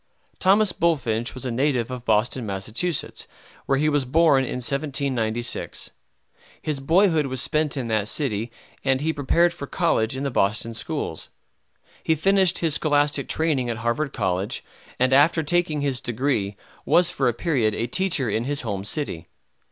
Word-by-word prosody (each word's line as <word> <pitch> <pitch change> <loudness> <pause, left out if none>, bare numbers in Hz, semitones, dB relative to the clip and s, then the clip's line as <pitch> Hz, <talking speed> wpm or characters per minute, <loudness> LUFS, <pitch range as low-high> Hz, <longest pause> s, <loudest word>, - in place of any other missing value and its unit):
Thomas 195 0 +4
Bulfinch 120 -9 0
was 130 - -6
a 125 - -2
native 130 -1 0
of 125 -1 -6
Boston, 110 +3 +1
Mass., 110 - -2 0.4
where 135 - +2
he 150 +3 +2
was 145 -2 +2
born 140 0 +4
in - - -4
1796. 125 -3 -2 0.7
His 150 -3 -3
boyhood 160 +1 +3
was 130 -1 -4
spent 150 +2 0
in 125 -3 -2
that 110 -2 0
city, 115 -4 -1 0.3
and 135 -1 +2
he 160 +1 0
prepared 170 +5 +2
for 155 -5 -7
college 130 -9 0
in 135 - -3
the 140 - -1
Boston 110 +2 0
schools. 110 -1 -4 0.7
He 160 - +2
finished 190 +2 +3
his 165 -3 0
scholastic 145 -2 +1
training 150 -6 0
at 115 - -2
Harvard 120 +6 -1
College, 95 -1 -2 0.3
and 130 +1 +2
after 155 +4 +4
taking 160 -1 0
his 135 -3 -1
degree 115 -5 -1 0.3
was 175 0 +4
for 135 - 0
a 120 - +2
period 120 -8 0
a 115 - -1
teacher 165 -1 0
in 110 +2 -1
his 145 +1 -2
home 100 -5 -3
city. 100 - -3
135 Hz, 160 wpm, -24 LUFS, 115-155 Hz, 0.7 s, Thomas